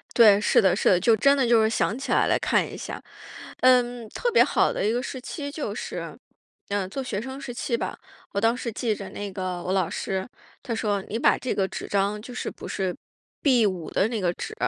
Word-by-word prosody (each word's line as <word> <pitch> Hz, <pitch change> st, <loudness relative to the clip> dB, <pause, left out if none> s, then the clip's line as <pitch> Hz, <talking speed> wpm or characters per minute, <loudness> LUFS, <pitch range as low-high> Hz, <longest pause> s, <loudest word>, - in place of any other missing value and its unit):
对， 210 Hz, -4 st, +7 dB
是 210 Hz, -, +4 dB
的 190 Hz, -3 st, +4 dB
是 190 Hz, -, 0 dB
的， 185 Hz, -, +5 dB
就 215 Hz, +6 st, +4 dB
真 275 Hz, +6 st, +4 dB
的 265 Hz, -, +2 dB
就 235 Hz, -1 st, +5 dB
是 220 Hz, -, +3 dB
想 220 Hz, -1 st, 0 dB
起 270 Hz, -, -6 dB
来 -, -, +4 dB
来 -, -, +2 dB
看 -, -, +2 dB
一 -, -, -8 dB
下。 -, -, -7 dB, 0.6 s
嗯， 245 Hz, -2 st, +3 dB
特 485 Hz, -, -1 dB
别 475 Hz, -, +6 dB
好 -, -, +2 dB
的 -, -, -1 dB
一 215 Hz, -, +2 dB
个 245 Hz, +1 st, -1 dB
时 260 Hz, 0 st, -6 dB
期 285 Hz, +3 st, -6 dB
就 285 Hz, -8 st, -4 dB
是， -, -, -6 dB, 0.5 s
嗯， 200 Hz, -2 st, -1 dB
做 270 Hz, +8 st, -4 dB
学 250 Hz, -6 st, -3 dB
生 265 Hz, +4 st, -7 dB
时 245 Hz, -, -6 dB
期 240 Hz, 0 st, -1 dB
吧。 -, -, -4 dB, 0.3 s
我 200 Hz, -, -1 dB
当 225 Hz, +2 st, +3 dB
时 245 Hz, -, -4 dB
记 225 Hz, 0 st, -1 dB
着 200 Hz, -2 st, -8 dB
那 205 Hz, -1 st, -6 dB
个 185 Hz, -1 st, -4 dB
我 185 Hz, -, -1 dB
老 190 Hz, -3 st, +1 dB
师， 190 Hz, -1 st, -2 dB, 0.4 s
他 240 Hz, -, -5 dB
说 210 Hz, -3 st, -1 dB
你 225 Hz, -, -2 dB
把 -, -, +4 dB
这 255 Hz, -, -3 dB
个 195 Hz, -, +1 dB
纸 -, -, -7 dB
张 200 Hz, +1 st, 0 dB
就 250 Hz, -, -9 dB
是 245 Hz, -, -4 dB
不 -, -, -8 dB
是 190 Hz, -2 st, -2 dB, 0.5 s
B5 210 Hz, -, +2 dB
的 195 Hz, -, +2 dB
那 225 Hz, -2 st, -2 dB
个 175 Hz, -2 st, +1 dB
纸， 440 Hz, -, -6 dB
220 Hz, 255 characters per minute, -25 LUFS, 195-245 Hz, 0.6 s, 对